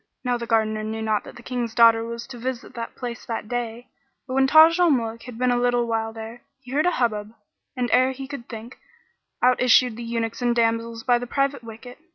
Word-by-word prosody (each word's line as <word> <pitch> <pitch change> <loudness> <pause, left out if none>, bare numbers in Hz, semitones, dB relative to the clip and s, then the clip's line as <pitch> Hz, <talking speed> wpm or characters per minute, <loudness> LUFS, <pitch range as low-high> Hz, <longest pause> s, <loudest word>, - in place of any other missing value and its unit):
Now 250 -1 0
the 235 -1 -5
Gardener 220 -1 +1
knew 220 +1 -4
not 215 -1 0
that - - -11
the 240 - -13
King's 240 -3 -3
daughter 230 -1 +6
was 235 0 -6
to 245 -2 -10
visit 250 0 -5
the 230 -1 -5
place 240 -1 -6
that 225 -3 -5
day; 240 0 -4 0.4
but 255 - -5
when 265 0 +3
Taj 320 +4 +7
al 350 -1 +5
Muluk 230 -5 0
had 245 -2 -9
been 250 0 +2
a 245 - +2
little 245 -1 +2
while 225 -1 -1
there, 225 +1 -9 0.2
he 255 -2 -13
heard 300 +5 +2
a - - +3
hubbub 215 -3 -1 0.4
and 250 -1 0
ere 255 +1 +4
he 265 +1 -7
could 280 -4 -8
think, 230 +2 -9 0.6
out 250 0 +4
issued 250 -1 +4
the 240 - -6
eunuchs 230 0 -3
and 240 -1 +1
damsels 230 0 0
by 245 -1 +3
the 245 - -6
private 275 0 -1
wicket. 230 +3 -11
240 Hz, 225 wpm, -23 LUFS, 225-250 Hz, 0.6 s, Taj